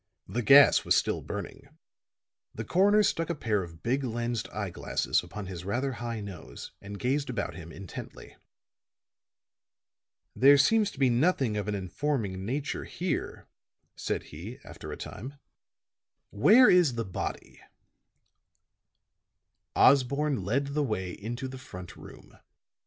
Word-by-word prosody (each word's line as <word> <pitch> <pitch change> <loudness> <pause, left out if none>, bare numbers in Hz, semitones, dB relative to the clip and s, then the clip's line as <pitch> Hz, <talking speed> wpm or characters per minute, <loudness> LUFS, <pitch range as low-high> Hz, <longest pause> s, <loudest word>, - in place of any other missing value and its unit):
The 115 +6 -2
gas 140 +4 +7
was - - +3
still - - +1
burning; 135 - -8 0.8
the 110 - -5
coroner 205 - +4
stuck 165 -4 0
a 170 - -1
pair 110 -7 0
of 80 -2 -10
big 130 +4 0
lensed 120 -1 -3
eyeglasses 100 -5 -1
upon 105 -1 -8
his 90 -2 -7
rather 130 +8 -1
high 115 -2 -5
nose 100 -3 -9
and 100 +1 -8
gazed 135 +5 -1
about 120 - -3
him 85 -2 -10
intently. 95 +1 -10 2.0
"There 140 +2 +7
seems 210 +9 +4
to - - -14
be 130 -2 +3
nothing 130 -3 +2
of 105 -1 -3
an 105 - -1
informing 100 -1 -2
nature 140 +4 -3
here," - - -4 0.5
said - - -3
he, 95 +11 -8
after - - -9
a - - -6
time. 135 +5 -8 1.0
"Where 220 - +6
is 175 -9 +5
the 115 -1 -2
body?" 95 - -6 2.1
Osborne 140 -2 +3
led 140 +8 -1
the 150 - +1
way 100 -9 -2
into 120 +7 -5
the 130 0 -8
front 90 -7 -10
room. - - -14
120 Hz, 135 wpm, -28 LUFS, 100-140 Hz, 2.1 s, gas